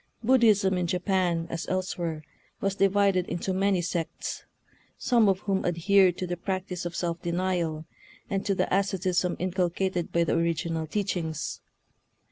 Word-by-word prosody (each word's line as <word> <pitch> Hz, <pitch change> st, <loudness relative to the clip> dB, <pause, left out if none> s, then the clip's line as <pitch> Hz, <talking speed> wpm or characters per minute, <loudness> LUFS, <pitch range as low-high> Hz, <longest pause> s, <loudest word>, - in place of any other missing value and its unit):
Buddhism 215 Hz, -6 st, +4 dB
in 175 Hz, -, 0 dB
Japan, 180 Hz, -2 st, 0 dB
as 165 Hz, -, -4 dB
elsewhere, 175 Hz, -4 st, -2 dB, 0.4 s
was 195 Hz, 0 st, 0 dB
divided 195 Hz, -2 st, +2 dB
into 175 Hz, +2 st, -2 dB
many 190 Hz, -1 st, +1 dB
sects, 170 Hz, -1 st, -4 dB, 0.5 s
some 230 Hz, -4 st, +3 dB
of 190 Hz, 0 st, +1 dB
whom 195 Hz, -2 st, 0 dB
adhered 180 Hz, +1 st, +3 dB
to 185 Hz, -, -2 dB
the 175 Hz, 0 st, -3 dB
practice 180 Hz, -1 st, -3 dB
of 170 Hz, -, -8 dB
self 170 Hz, -1 st, -2 dB
denial, 170 Hz, -3 st, -1 dB, 0.4 s
and 195 Hz, -1 st, -2 dB
to 200 Hz, -, +2 dB
the -, -, +1 dB
asceticism 185 Hz, -2 st, 0 dB
inculcated 180 Hz, 0 st, -1 dB
by 170 Hz, -, +2 dB
the -, -, 0 dB
origi 170 Hz, 0 st, 0 dB
nal 160 Hz, -1 st, -2 dB
teachings. 165 Hz, -4 st, -2 dB
180 Hz, 145 wpm, -27 LUFS, 170-195 Hz, 0.5 s, Buddhism